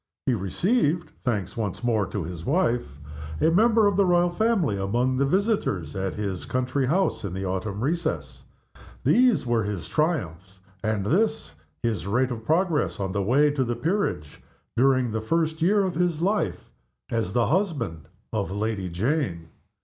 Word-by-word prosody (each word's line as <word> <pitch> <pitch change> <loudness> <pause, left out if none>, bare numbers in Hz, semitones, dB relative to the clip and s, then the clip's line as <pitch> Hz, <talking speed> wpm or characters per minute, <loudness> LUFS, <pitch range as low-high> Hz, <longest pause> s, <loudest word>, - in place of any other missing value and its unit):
He 130 - +2
received 170 - 0
(thanks 105 -8 -1
once 105 -3 -3
more 110 -4 +1
to 100 - -3
his 85 0 -6
wife) 120 - 0 0.4
a 160 - +3
member 220 +4 +4
of 200 -2 +2
the 200 - +4
Royal 175 0 +3
family 190 - +1
among 120 +7 0
the 135 +1 +2
visitors 185 - 0
at 95 0 -2
his 100 -4 -3
country 130 +1 -1
house 155 -8 +1
in 95 -3 -4
the 95 0 -3
autumn 95 +3 -3
recess. 160 +4 -2 0.6
These 245 - +4
were 120 -2 +1
his 100 -4 -4
triumphs, 95 - -2 0.2
and 110 -3 0
this 200 - +1 0.3
his 110 -4 -1
rate 125 +5 +1
of 115 -2 -5
progress 160 - +1
on 95 -1 -2
the 100 +1 -1
way 140 +9 +3
to 140 -2 0
the 120 -1 -2
peerage, 155 - -2 0.3
during 130 -1 +3
the 110 0 -2
first 160 +6 0
year 200 +4 +4
of 185 -2 -1
his 170 -1 0
life 200 +5 -1 0.4
as 110 -5 -1
the 120 -1 +3
husband 145 - -1 0.3
of 105 -3 -1
Lady 100 -1 -2
Jane. 90 - -1
125 Hz, 165 wpm, -25 LUFS, -, 0.6 s, member